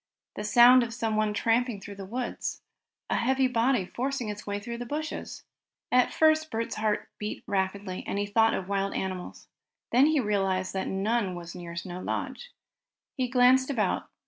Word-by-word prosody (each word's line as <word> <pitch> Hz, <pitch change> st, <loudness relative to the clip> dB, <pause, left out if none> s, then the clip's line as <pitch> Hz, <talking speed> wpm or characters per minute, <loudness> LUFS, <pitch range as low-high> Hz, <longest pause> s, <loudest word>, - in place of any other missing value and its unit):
The 210 Hz, -, -5 dB
sound 240 Hz, +4 st, +7 dB
of 230 Hz, -1 st, -3 dB
someone 215 Hz, -2 st, 0 dB
tramping 230 Hz, +1 st, +1 dB
through 200 Hz, +1 st, -9 dB
the 195 Hz, -1 st, -8 dB
woods. 245 Hz, +4 st, -4 dB, 0.5 s
A -, -, +2 dB
heavy 265 Hz, +2 st, +2 dB
body 240 Hz, -3 st, +2 dB
forcing 250 Hz, +2 st, -3 dB
its 210 Hz, +1 st, -7 dB
way 205 Hz, 0 st, -2 dB
through 235 Hz, +3 st, -6 dB
the 245 Hz, -, -4 dB
bushes! 310 Hz, +4 st, -5 dB, 0.5 s
At 250 Hz, 0 st, +4 dB
first 315 Hz, 0 st, +3 dB
Bert's 225 Hz, +1 st, -3 dB
heart 215 Hz, -1 st, 0 dB
beat 210 Hz, 0 st, -5 dB
rapidly, 190 Hz, -1 st, -2 dB
and -, -, -2 dB
he 205 Hz, -, 0 dB
thought 225 Hz, +2 st, +3 dB
of 185 Hz, -, -4 dB
wild 195 Hz, 0 st, -1 dB
animals. 185 Hz, -1 st, -5 dB, 0.4 s
Then 255 Hz, +5 st, +6 dB
he 310 Hz, -1 st, +3 dB
realized 195 Hz, -4 st, 0 dB
that 190 Hz, -1 st, -2 dB
none 200 Hz, 0 st, 0 dB
was 175 Hz, -1 st, -8 dB
near 170 Hz, -1 st, -8 dB
Snow 175 Hz, +1 st, -6 dB
Lodge. -, -, -4 dB, 0.6 s
He 255 Hz, -2 st, -1 dB
glanced 255 Hz, +1 st, +4 dB
about. 220 Hz, -9 st, 0 dB
220 Hz, 170 wpm, -28 LUFS, 195-250 Hz, 0.6 s, sound